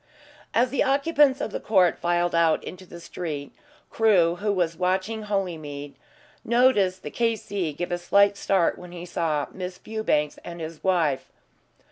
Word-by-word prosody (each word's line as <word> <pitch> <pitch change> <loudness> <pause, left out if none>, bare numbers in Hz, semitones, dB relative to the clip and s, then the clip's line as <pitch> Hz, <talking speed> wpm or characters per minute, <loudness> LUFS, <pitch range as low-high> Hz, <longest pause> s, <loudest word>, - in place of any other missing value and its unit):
As 245 +2 +2
the 280 - 0
occupants 275 0 +3
of - - -3
the - - -3
court 185 -5 +3
filed 175 0 +1
out 165 -2 +3
into 185 0 -9
the 170 - -10
street, 155 -5 -6 0.4
Crewe, 180 -6 +3
who 205 +2 -1
was 175 -4 0
watching 190 +5 -1
Holymead, 155 -8 -4 0.5
noticed 220 -6 +3
the 150 - -6
K.C. 205 -7 -1
give 175 +4 -4
a 175 - -1
slight 200 +3 +4
start 190 -3 +1
when 180 0 -11
he 175 0 -7
saw 160 -4 -1
Miss 180 -1 -6
Fewbanks 180 -10 -1
and 170 0 -8
his 160 -1 -7
wife. 165 -8 +1
180 Hz, 155 wpm, -25 LUFS, 170-210 Hz, 0.5 s, slight